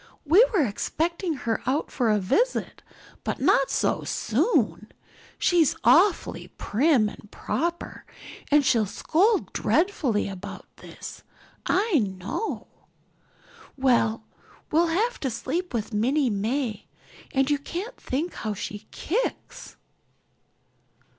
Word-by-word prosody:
We 345 +10 +7
were 365 - +3
expecting 330 - -2
her 230 -4 -2
out 280 +4 0
for 240 -4 +1
a 210 - +4
visit, 440 - 0 0.4
but - - -3
not - - +3
so - - 0
soon. 215 - 0 0.5
She's 340 -5 +3
awfully 335 - +3
prim 250 -1 +2
and 210 0 -10
proper 340 +10 -3 0.5
and 295 -1 +4
she'll 225 -5 +3
scold 385 - +1
dreadfully 315 - +1
about 195 +1 -8
this, - - -10 0.5
I 395 -5 +3
know. 200 - -3 1.1
Well, 235 -4 +2 0.5
we'll 335 +3 +4
have 430 +9 0
to 270 - -1
sleep 320 +10 -3
with 230 -1 -3
Minnie 255 +5 +2
May 220 +2 -2 0.4
and 270 -1 +2
you 290 - +2
can't 370 - -6
think 305 +7 -3
how 215 -2 -4
she 205 +2 -6
kicks." 450 +10 -4
275 Hz, 115 wpm, -25 LUFS, 220-345 Hz, 1.1 s, We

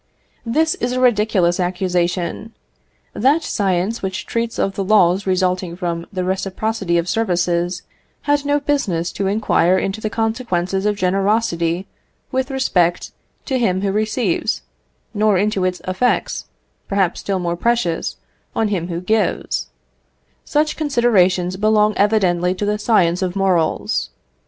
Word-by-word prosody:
This 315 +8 +2
is 250 -10 -2
a 255 - -1
ridiculous 210 -8 +2
accusation. 180 - -1 0.6
That 280 +8 +2
science 195 +2 -1
which 190 0 -4
treats 230 0 -2
of 195 - 0
the 195 - -2
laws 190 -2 +3
resulting 185 -1 0
from 170 -2 -3
the 185 -2 -2
reciprocity 190 0 -1
of 170 0 0
services, 175 -4 0 0.4
had 290 -1 +1
no 290 0 +1
business 210 - -1
to 195 - -2
inquire 190 -3 +2
into 195 +3 -2
the 215 - -1
consequences 210 -4 -1
of 210 - +1
generosity 190 -2 0 0.5
with 260 0 -1
respect 180 -11 +1 0.3
to 265 -2 0
him 190 -5 +1
who 200 -1 0
receives, 215 - 0 0.5
nor 210 -1 +3
into 205 0 0
its 180 0 -2
effects, 185 +7 0 0.4
perhaps 195 -3 0
still 195 -1 -2
more 175 -1 -2
precious, 205 -4 0 0.4
on 220 -2 +1
him 180 -4 -2
who 170 -1 -4
gives: 210 +1 0 0.8
such 300 +1 0
considerations 190 - +2
belong 215 +1 +3
evidently 185 -4 +2
to 205 - -2
the 210 +1 0
science 180 -6 +2
of 185 0 -2
morals. 185 -5 0
195 Hz, 135 wpm, -19 LUFS, 180-220 Hz, 0.8 s, laws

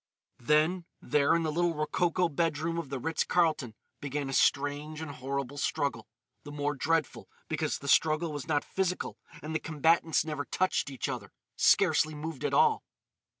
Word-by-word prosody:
Then, 155 +7 +2
there 150 +2 +2
in 170 - +1
the 155 - -1
little 170 +1 +1
rococo 170 +4 +1
bedroom 165 +1 -1
of 160 -5 -6
the 135 - -3
Ritz 160 +5 -1
Carlton, 155 -10 +1 0.2
began 140 0 -3
a - - -4
strange 145 +3 +1
and 160 -2 -5
horrible 140 +1 -4
struggle—the 115 +1 -4
more 145 0 -1
dreadful 155 +2 -1 0.2
because - - -1
the 140 - -9
struggle 155 +2 +3
was 145 0 -6
not 145 -2 +1
physical 185 -1 -2 0.2
and 155 +1 -5
the 160 - 0
combatants 160 0 +2
never 150 -2 -3
touched 185 -5 0
each 135 - -4
other—scarcely 155 0 +1
moved 150 -2 -6
at - - -1
all. - - +4
150 Hz, 155 wpm, -30 LUFS, 145-165 Hz, 0.2 s, all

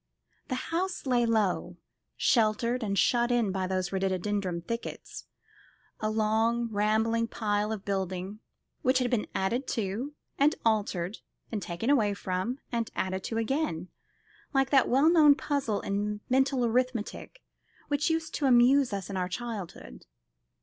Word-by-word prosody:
The 255 - -2 0.2
house 365 0 -1
lay 245 -3 +2
low, 195 -5 0 0.4
sheltered 235 +2 +2
and 200 -3 -1
shut 240 +5 +3
in 235 -5 +2
by 190 -1 -1
those 185 -1 -1
rhododendron 190 -1 -1
thickets, 230 +6 -6 0.7
a 215 - -1
long, 225 +2 +1
rambling 220 +2 +1
pile 210 -1 -1
of 210 -3 -5
building, 190 +1 -3 0.4
which 255 -2 +3
had 250 -1 0
been 235 -4 0
added 235 +8 0
to, 225 +8 -3 0.2
and 290 +3 +4
altered, 205 -3 0 0.3
and 215 -3 -2
taken 175 +9 -2
away 210 -8 +3
from, 190 +6 -2
and 230 -2 -1
added 190 0 -2
to 225 - -3
again, 225 - -1 0.7
like 270 -1 +2
that 270 -2 +4
well 270 +5 +4
known 310 -4 +7
puzzle 275 -9 -1
in 205 +1 -2
mental 265 -1 +3
arithmetic 250 - -2 0.4
which 290 +1 +1
used 325 -1 -1
to 285 - 0
amuse 250 0 +5
us 195 -2 -3
in 195 - -4
our 180 -1 -1
childhood. 190 - -7
225 Hz, 145 wpm, -29 LUFS, 195-255 Hz, 0.7 s, known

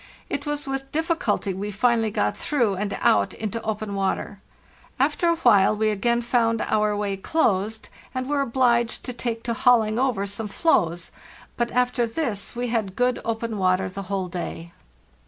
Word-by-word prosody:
It 285 0 -3
was 295 0 -2
with 270 0 -4
difficulty 315 - 0
we 200 +3 -4
finally 225 +2 +2
got 105 - 0
through 240 -9 0
and 200 +1 -3
out 100 -1 +3
into 220 +1 -4
open 215 -1 -3
water. 195 0 -2 0.6
After 345 - +2
a 335 - +4
while 215 -10 +4
we 215 0 +2
again 235 +3 +1
found 230 -1 +2
our 210 -1 +1
way 205 -1 -1
closed, 215 -2 0 0.2
and 255 -1 -3
were 285 0 +1
obliged 240 -2 +1
to 250 - -4
take 235 -1 -3
to 235 - -1
hauling 235 -3 +3
over 250 -7 +1
some 200 +2 -4
floes, 175 - +1 0.4
but 235 0 0
after 250 -1 +1
this 225 -5 -3
we 245 0 -2
had 215 -5 -1
good 250 0 +1
open 225 -1 -3
water 185 0 +2
the 195 +2 -6
whole 195 -2 -1
day. 170 -1 -6
225 Hz, 170 wpm, -24 LUFS, 200-245 Hz, 0.6 s, a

